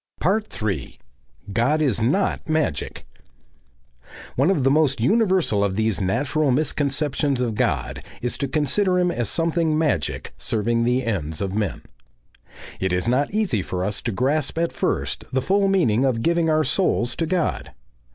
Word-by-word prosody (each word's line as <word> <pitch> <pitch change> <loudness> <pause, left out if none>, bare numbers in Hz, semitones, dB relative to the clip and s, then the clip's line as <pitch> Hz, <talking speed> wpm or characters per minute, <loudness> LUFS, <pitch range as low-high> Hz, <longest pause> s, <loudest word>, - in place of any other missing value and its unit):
3. 95 -11 -4 0.6
GOD 120 +8 +2
IS 130 -8 +1
NOT 160 - 0
MAGIC 155 - -1 1.3
One 140 +7 +3
of 180 -9 +2
the 135 - +4
most 145 -3 +2
universal 185 - +2
of 100 -2 0
these 110 -1 0
natural 145 +10 0
misconceptions 140 0 0
of 120 -3 0
God - - -1 0.2
is 125 - -2
to 140 - -1
consider 180 +7 +1
him 180 -1 +2
as 120 -7 -2
something 165 -1 +1
magic 150 - -1
serving 115 +2 0
the 125 +1 +1
ends 80 -9 -2
of 95 -1 -2
men. 105 -6 -2 1.0
It 95 -1 -1
is 90 +4 0
not 130 +4 +2
easy 200 - 0
for 90 0 -3
us 105 0 -2
to 115 - -2
grasp 135 +7 0
at 170 0 0
first - - -2
the 130 - +1
full 195 +8 +2
meaning 145 - +2
of 125 -4 +1
giving 170 -1 +2
our 155 0 +3
souls 125 -10 +1
to 165 - -1
God. 175 0 -1
135 Hz, 155 wpm, -23 LUFS, 110-160 Hz, 1.3 s, the